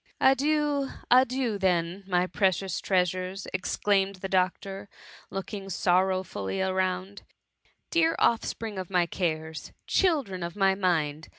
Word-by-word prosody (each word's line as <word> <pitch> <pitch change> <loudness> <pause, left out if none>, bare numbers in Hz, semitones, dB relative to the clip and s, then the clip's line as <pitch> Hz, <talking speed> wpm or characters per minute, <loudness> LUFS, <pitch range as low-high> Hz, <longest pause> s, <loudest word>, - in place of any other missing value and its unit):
*" - - -35
" - - -46
Adieu! 285 0 +1 0.2
adieu! 255 -3 +3
then, 180 0 0
my 180 -1 +2
precious 190 -1 0
trea 185 -2 +3
sures!" 185 +2 -4
exclaimed 195 +1 +1
the 190 +1 -5
doctor, 195 +1 -1 0.4
looking 195 0 -6
sorrow 185 0 +2
fully 100 - -4
around: 190 +1 -1 0.4
" - - -40
Dear 330 -1 +3
oflFspring 225 -3 0
of 185 - -9
my 180 -2 +2
cares 160 -3 -3
I - - -25
children 280 - +1
of 170 0 -5
my 195 -1 +3
mind 160 -6 -1
190 Hz, 140 wpm, -27 LUFS, 180-205 Hz, 0.4 s, adieu